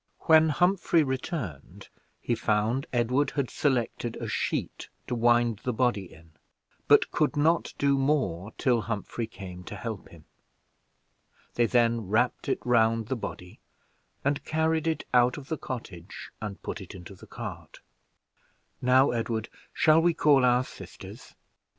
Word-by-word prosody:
When 160 -1 +5
Humphrey 175 0 +3
returned, 130 - -5 0.3
he 120 - -1
found 110 +3 0
Edward 125 +3 +1
had 140 -3 -1
selected 120 -4 -1
a - - -5
sheet - - -3 0.2
to - - -4
wind 120 -2 +3
the 125 - -1
body 110 -6 0
in, 80 0 -17 0.6
but - - +5
could 150 -1 0
not 160 +3 +2
do 140 -1 +2
more 130 - 0
till 120 -3 +2
Humphrey 115 +1 -4
came 90 -4 -9
to - - -7
help 105 -2 -6
him. 80 -3 -16 1.3
They 120 -1 +2
then 115 -1 +2
wrapped 120 +7 0
it - - +1
round 115 -2 +2
the 130 - 0
body, 90 -6 -8 0.7
and 140 0 0
carried 160 0 0
it 160 - -1
out 125 +1 +4
of 140 -1 -10
the 160 - -2
cottage, 100 -8 -8
and 105 -2 -6
put - - -5
it 95 - -10
into 95 +1 -10
the 95 - -15
cart. - - -8 1.0
"Now, 130 +2 +4
Edward, 115 -1 -2 0.2
shall 155 +1 +4
we 170 0 +2
call 145 -4 +4
our 125 0 +4
sisters?" - - -12
120 Hz, 145 wpm, -27 LUFS, 110-140 Hz, 1.3 s, When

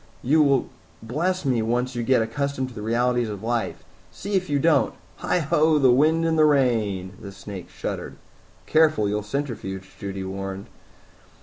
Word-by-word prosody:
You 155 +5 +4
will 140 -3 +3 0.4
bless 170 +9 -1
me, 125 -4 +2
once 120 +3 -1
you 120 - -1
get 120 -1 +3
accustomed 130 +2 -2
to - - -13
the 105 - -7
realities 120 +1 +1
of 105 -1 -6
life 115 0 -2 0.3
see 205 +2 -6
if 185 -3 0
you 145 - +2
don't. 160 +2 +2 0.2
Heigh - - 0
ho 155 0 +3
the 135 -4 +5
wind 155 +6 +3
and 160 -1 +1
the 155 - +6
rain!" 110 -10 +1
The 100 - -8
snake 95 -2 -9
shuddered. - - -5 0.5
"Careful, 155 -4 +3
you'll 105 +1 -1
centrifuge," 105 -5 -5
Judy 100 -1 -5
warned. 95 +1 -5
125 Hz, 170 wpm, -24 LUFS, 105-150 Hz, 0.5 s, the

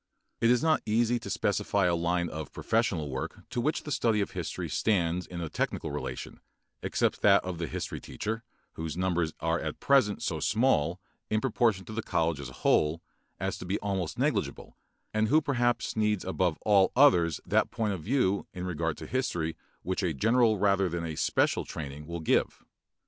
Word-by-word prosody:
It 115 - +3
is 125 +2 +3
not 160 -1 +3
easy 115 +2 +2
to - - -8
specify 100 -2 +1
a 90 - +3
line 85 +1 0
of 80 -1 -6
professional 95 -10 0
work 65 - -5
to 120 - -1
which 155 +5 0
the 150 - -6
study 115 -5 +2
of 100 - -1
history - - -4
stands 90 -4 0
in 85 -1 -6
a 85 - -3
technical - - -2
relation, - - -5 0.4
except - - 0
that 100 -2 +5
of 90 -2 -4
the 85 - -2
history - - -4
teacher, 110 +2 -4 0.3
whose 80 +1 -5
numbers 90 -3 0
are 80 +1 +1
at 80 -1 -4
present 130 -7 +3
so 80 -4 -1
small, 90 - +2 0.3
in 110 - +2
proportion 110 -6 +1
to 110 - -8
the 115 - -2
college 80 -7 0
as 70 -2 -6
a 65 - -15
whole, 80 +2 +3 0.4
as - - -2
to - - -7
be 100 +3 0
almost 95 -5 -3
negligible, - - -1 0.4
and 110 0 +2
who 150 +7 +5
perhaps 120 -5 0
needs 105 -2 +1
above 90 -3 0
all 100 -3 +5
others 90 - +5
that - - +2
point 110 -3 -1
of 90 - -5
view 100 - +1
in 90 0 -4
regard 85 -3 -2
to - - -8
history 85 -11 -1 0.3
which 95 +2 -1
a 85 -5 -1
general 115 - +3
rather 100 -1 +2
than 85 0 -3
a 80 -2 -4
special - - +1
training 75 -1 -7
will 85 0 -5
give. 80 - +1
95 Hz, 190 wpm, -29 LUFS, 85-110 Hz, 0.4 s, that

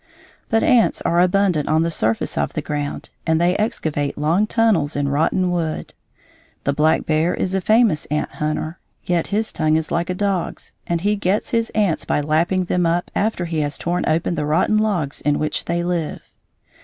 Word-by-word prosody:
But 225 0 +2
ants 240 -3 +3
are 170 - +1
abundant 180 -4 +2
on 155 +1 +3
the 165 - -1
surface 110 -7 0
of 70 0 -1
the - - -2
ground, 145 -1 -4 0.2
and 160 0 +3
they 175 +2 +2
excavate 155 -9 -2
long 165 +8 +2
tunnels 215 -11 +2
in 140 -1 0
rotten 165 +5 +1
wood. 165 -3 -3 0.7
The 140 - +1
black 155 +2 +2
bear 160 +2 +1
is 190 - -2
a 190 - +1
famous 215 -6 +3
ant 150 0 -2
hunter, 155 +2 -3 0.3
yet 175 -2 0
his 215 +2 -1
tongue 155 -1 +1
is 160 -1 -1
like 170 +1 -1
a 180 - -1
dog's 195 -2 -2
and 170 -1 -1
he 205 +3 +1
gets 205 +7 -1
his 230 -2 +1
ants 205 -7 +1
by - - +1
lapping 160 +5 +1
them 175 -1 +1
up 170 +1 -1
after 205 -4 0
he 165 -2 -2
has 145 -1 -1
torn 175 +1 -1
open 165 +2 +1
the 150 - -2
rotten 180 +7 +2
logs 180 -10 -1
in 150 0 +1
which 155 -1 -2
they 170 0 -1
live. 175 -3 -2
170 Hz, 190 wpm, -20 LUFS, 155-190 Hz, 0.7 s, ants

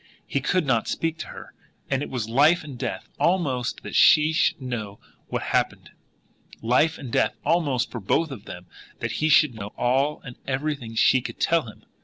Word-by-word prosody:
He 140 - -2
could 175 +4 +1
not 120 -5 +1
speak 165 0 -2
to - - -5
her - - -11 0.3
and 135 0 0
it - - -4
was 120 -4 -3
life 150 +9 +4
and 145 -4 -8
death 95 -5 -4
almost 140 -9 0
that - - -7
she 155 +1 +6
should 160 - +2
know 115 -6 -5 0.3
what - - -3
had - - -5
happened; - - -1 0.7
life 130 +8 +2
and 130 -4 -8
death 110 - +1
almost 145 -8 +1
for 120 - -5
both 145 - 0
of 115 -7 -9
them 90 0 -9 0.3
that 115 - -3
he 155 - +2
should 150 -3 +5
know 105 -2 -8
all 135 +5 +1
and 125 -3 -10
everything 135 -4 -3
she 130 +3 +4
could - - -8
tell 165 -6 +2
him. 105 - -13
135 Hz, 195 wpm, -24 LUFS, 120-155 Hz, 0.7 s, she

